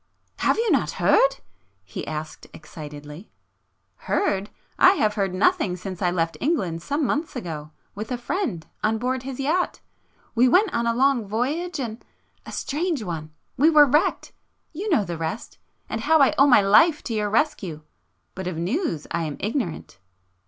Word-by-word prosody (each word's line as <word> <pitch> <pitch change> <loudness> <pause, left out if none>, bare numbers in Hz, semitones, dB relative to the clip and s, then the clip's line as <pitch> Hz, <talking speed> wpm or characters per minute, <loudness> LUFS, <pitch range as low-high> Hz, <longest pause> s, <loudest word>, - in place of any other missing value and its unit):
"Have - - +2
you 455 -2 +1
not 230 - +1
heard?" 205 +9 +4 0.5
he 95 - -7
asked 155 0 -6
excitedly. 150 +3 -10 0.8
"Heard? 200 - 0 0.3
I 370 - +8
have 215 - +1
heard 195 -3 -1
nothing 205 - +2
since 185 0 -7
I 180 - +2
left 165 -2 -1
England 190 - 0
some 285 - -1
months 300 +4 -2
ago—with 170 - -7
a 250 - -1
friend, 240 - -3 0.2
on 220 +1 +2
board 255 +2 -1
his 265 0 -7
yacht... 320 +7 0 0.5
we 245 +2 +4
went 375 - +3
on 235 0 0
a 230 - +1
long 260 -4 +2
voyage 290 - -2
and... 230 -3 -5 0.4
a - - -7
strange 310 -3 -2
one! 160 -4 -5 0.3
We 300 +5 +5
were 300 -2 +7
wrecked,... 295 +4 +1 0.4
you 390 +7 -4
know 285 - +3
the 170 -2 -5
rest, 165 +8 -5 0.3
and 220 - -4
how 320 +6 +4
I 275 - +5
owe 275 - +5
my 245 -6 +7
life 295 - +5
to 235 - -4
your 210 -1 0
rescue. 200 - -1 0.5
But 190 -1 -6
of 180 -3 -3
news 175 - -2
I 170 -1 -1
am 150 -2 -5
ignorant 210 - -3
225 Hz, 165 wpm, -24 LUFS, 175-290 Hz, 0.8 s, I